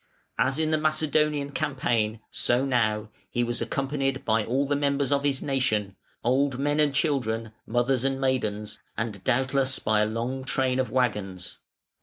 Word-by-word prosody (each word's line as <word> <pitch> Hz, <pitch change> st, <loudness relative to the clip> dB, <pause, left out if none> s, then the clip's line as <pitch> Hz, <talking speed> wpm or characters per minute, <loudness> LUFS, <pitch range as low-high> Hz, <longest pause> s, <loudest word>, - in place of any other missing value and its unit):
As 130 Hz, +1 st, +2 dB
in 160 Hz, 0 st, +1 dB
the 155 Hz, -, +2 dB
Macedonian 150 Hz, -2 st, +1 dB
campaign, 120 Hz, -7 st, 0 dB
so 125 Hz, +3 st, +1 dB
now, 110 Hz, -5 st, +1 dB, 0.2 s
he 120 Hz, -, 0 dB
was 120 Hz, 0 st, -2 dB
accompanied 135 Hz, +2 st, -1 dB
by 110 Hz, 0 st, +2 dB
all 130 Hz, +6 st, 0 dB
the 145 Hz, +1 st, 0 dB
members 140 Hz, -1 st, +1 dB
of 140 Hz, 0 st, +2 dB
his 140 Hz, -2 st, +1 dB
nation, 110 Hz, -8 st, 0 dB, 0.3 s
old 135 Hz, +2 st, +2 dB
men 145 Hz, +2 st, 0 dB
and 150 Hz, -1 st, +4 dB
children, 115 Hz, -7 st, 0 dB, 0.2 s
mothers 120 Hz, +2 st, +1 dB
and 135 Hz, 0 st, 0 dB
maidens, 105 Hz, -6 st, -1 dB, 0.2 s
and 110 Hz, -4 st, -3 dB
doubtless 130 Hz, +1 st, +1 dB
by 110 Hz, 0 st, +2 dB
a 105 Hz, -, +2 dB
long 120 Hz, +4 st, -3 dB
train 130 Hz, -1 st, +1 dB
of 130 Hz, -, 0 dB
waggons. 100 Hz, -8 st, -2 dB
130 Hz, 160 wpm, -26 LUFS, 115-140 Hz, 0.3 s, and